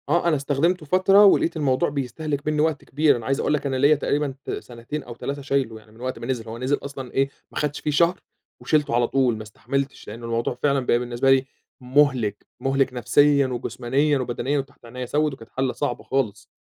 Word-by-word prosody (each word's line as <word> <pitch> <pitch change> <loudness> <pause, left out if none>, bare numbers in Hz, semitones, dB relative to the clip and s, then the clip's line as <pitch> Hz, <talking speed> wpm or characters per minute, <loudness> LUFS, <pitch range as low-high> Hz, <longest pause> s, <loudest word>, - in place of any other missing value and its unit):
آه، 170 +3 +2
أنا 165 - +3
استخدمته 150 +5 0
فترة 190 +5 +5
ولقيت 170 -4 +4
الموضوع 135 -4 +1
بيستهلك 145 +2 -3
مِنّي 150 -1 +1
وقت 155 -2 0
كبير 145 0 +3
أنا 115 - -8
عايز 135 +2 0
أقول 150 - +1
لك 150 - -1
أنا 135 -1 -1
ليّا 140 +4 +5
تقريبًا 145 -1 -1
ت - - -7
سنتين 125 +5 -6
أو 120 - -9
3 140 +4 -5
شايلُه، 135 -5 -1
يعني 110 0 -21
من 110 +2 -16
وقت 130 +1 -4
ما - - -6
نزِل 120 -4 -3
هو 115 - -6
نزِل 130 +4 0
أصلًا 135 -3 -7
إيه 135 +1 +1 0.2
ما - - -9
خدتش 150 -1 -1
فيه 150 - -2
شهر 170 +4 +3 0.4
وشِلتُه 150 -6 +1
على 120 0 +3
طول 130 -4 +2
ما 110 - -6
استحملتش، 135 +5 -4
لأنّه 115 +2 -8
الموضوع 115 +1 -1
فعلًا 140 -2 +3
بقى 120 - +3
بالنسبة 125 +2 +1
لي 135 0 +4 0.4
مُهلك 125 -5 +2
مُهلك 135 0 +1
نفسيًا 140 +3 +3
وجسمانيًا 130 +3 0
وبدنيًا 130 +3 -1
وتحت 135 -2 -9
عينيّا 125 +2 -6
سوِّد 150 +3 0
وكانت 115 -4 -12
حالة 130 -1 -1
صعبة 145 -4 -3
خالص. 110 -6 -2
135 Hz, 210 wpm, -23 LUFS, 125-145 Hz, 0.4 s, فترة